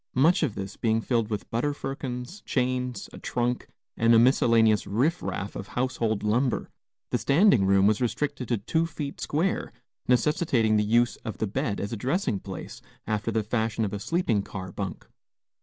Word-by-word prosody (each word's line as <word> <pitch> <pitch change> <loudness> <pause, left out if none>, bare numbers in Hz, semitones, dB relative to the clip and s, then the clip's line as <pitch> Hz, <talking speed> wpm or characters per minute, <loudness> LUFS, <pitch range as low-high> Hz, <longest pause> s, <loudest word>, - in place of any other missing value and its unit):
Much 160 +9 +4
of 140 -10 0
this 95 0 -6
being 110 -1 +1
filled 115 -1 0
with 105 -3 -3
butter 140 +5 0
firkins, 135 +5 -5
chains, 125 -1 -1
a - - -9
trunk, 120 0 -1 0.3
and 115 0 +4
a - - +7
miscellaneous 115 -3 +4
riff 140 - +1
raff 100 - -4
of 100 - -6
household 120 -4 0
lumber, 120 +4 0 0.4
the - - +1
standing 140 - +4
room 100 0 +4
was 105 +3 +3
restricted 135 +1 -1
to 120 - +1
two 160 +11 0
feet 150 -4 -6
square, 170 +6 -1 0.4
necessitating 125 -4 +2
the 105 - +3
use 120 +3 +2
of 110 - -7
the - - 0
bed 110 0 -2
as 100 +3 -3
a - - -3
dressing 130 - 0
place, 95 -2 -8 0.2
after 110 +1 -1
the 110 -1 0
fashion 110 0 -1
of 100 - -4
a 100 - -3
sleeping 120 - 0
car 95 -2 -7
bunk. 95 -3 -5
115 Hz, 175 wpm, -27 LUFS, 105-135 Hz, 0.4 s, a